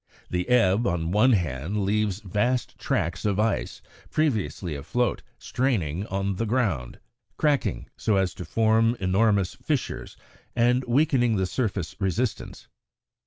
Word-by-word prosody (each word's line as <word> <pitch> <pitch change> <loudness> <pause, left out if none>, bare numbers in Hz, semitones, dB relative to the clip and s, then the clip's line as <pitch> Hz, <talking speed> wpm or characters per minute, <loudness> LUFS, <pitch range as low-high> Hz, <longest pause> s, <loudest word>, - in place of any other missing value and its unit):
The 90 0 -1
ebb, 115 -2 +4
on 85 -1 -1
one 110 +6 +5
hand, 90 - -1
leaves 105 0 0
vast 105 +6 -1
tracks 85 +2 -1
of 105 -1 0
ice, 110 -1 -1 0.3
previously 110 - -1
afloat, 100 - -1 0.2
straining 100 - -1
on 95 0 -2
the 115 +2 -1
ground, 105 - -1 0.4
cracking 150 -3 0
so 110 - +1
as 95 -2 +1
to - - -7
form 115 +1 +2
enormous 100 0 +2
fissures 150 -5 -3 0.4
and 125 +2 +3
weakening 120 -2 +2
the 95 -2 +1
surface 100 -5 -2
resistance. 105 +5 -2
105 Hz, 125 wpm, -26 LUFS, 95-120 Hz, 0.4 s, one